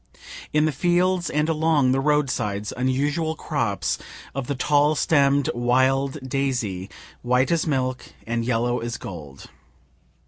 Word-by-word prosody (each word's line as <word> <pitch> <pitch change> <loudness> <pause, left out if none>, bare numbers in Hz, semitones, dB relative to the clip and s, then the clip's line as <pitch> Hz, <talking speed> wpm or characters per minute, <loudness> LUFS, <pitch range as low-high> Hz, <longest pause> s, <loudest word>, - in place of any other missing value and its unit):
In 150 0 +3
the 155 - +1
fields 175 +4 +1
and 150 +1 0
along 155 -4 +2
the 135 - +2
road 150 -1 +2
sides 105 -2 -3
unusual 145 +5 0
crops 115 -13 -2 0.3
of 135 -2 -4
the 140 - -1
tall 145 +3 +3
stemm'd 140 -2 +3
wild 130 +3 +2
daisy, 120 -9 -2 0.3
white 125 +3 +2
as 165 -1 +1
milk 130 -3 -1 0.2
and 115 0 -1
yellow 120 +1 0
as 120 0 -4
gold. 75 -7 -9
135 Hz, 135 wpm, -23 LUFS, 120-150 Hz, 0.3 s, In